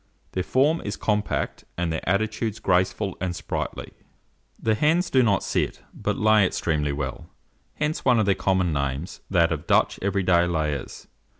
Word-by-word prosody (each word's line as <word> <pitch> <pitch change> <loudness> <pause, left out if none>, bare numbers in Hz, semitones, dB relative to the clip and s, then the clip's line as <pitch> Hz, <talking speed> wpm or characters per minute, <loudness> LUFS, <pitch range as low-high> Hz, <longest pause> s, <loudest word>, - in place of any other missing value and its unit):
Their 95 - -1
form 140 - +2
is 105 +1 -4
compact, 105 -1 -1
and 85 -2 -1
their 80 - -2
attitudes 110 +2 0
graceful 95 +1 +1
and 90 -2 -2
sprightly. - - -4 0.7
The 110 - +1
hens 160 +9 +2
do 130 - +5
not 100 -6 +2
sit, - - -2
but - - -2
lay 110 -1 +5
extremely 75 -5 0
well; 70 -2 -5 0.5
hence 150 +1 -2
one 125 -2 +4
of 110 - +3
their 100 - +4
common 95 -3 +1
names, 70 +5 -3
that 85 -3 +3
of 75 -2 -3
Dutch - - +3
every 100 0 0
day 85 -1 +4
layers. 75 -5 -3
95 Hz, 165 wpm, -25 LUFS, 85-110 Hz, 0.7 s, do